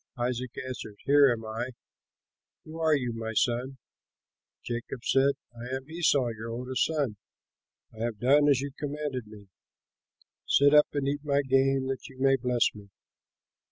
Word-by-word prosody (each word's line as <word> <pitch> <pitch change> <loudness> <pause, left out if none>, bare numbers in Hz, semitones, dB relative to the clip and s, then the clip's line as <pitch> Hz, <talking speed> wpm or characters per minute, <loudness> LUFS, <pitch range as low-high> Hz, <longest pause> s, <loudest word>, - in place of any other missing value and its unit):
Isaac 125 0 -2
answered, 115 -5 -7
"Here 140 -1 +6
am 115 -2 -3
I; 115 +4 -4 0.9
who 160 +1 -9
are 160 -1 +3
you, 125 -4 -2
my 115 0 -4
son?" 125 +4 0 0.9
Jacob 120 +1 -5
said, 135 +1 +3 0.2
"I 120 +1 -8
am 135 +1 -7
Esau 145 -7 +2
your 115 0 -6
oldest 125 +2 -1
son. 145 -9 -1 0.8
I 110 - -14
have 115 -3 -3
done 145 +5 +4
as 135 -2 +3
you 140 0 -4
commanded 145 -5 -4
me. 105 -2 -14 1.0
Sit 145 +1 +5
up 150 0 +7
and 140 -2 -1
eat 145 +1 0
of 150 - -23
my 140 -1 +2
game, 135 0 +2
that 135 -1 -4
you 130 - -15
may 135 0 +4
bless 125 -2 +1
me." 105 -1 -13
130 Hz, 160 wpm, -28 LUFS, 120-140 Hz, 1.0 s, up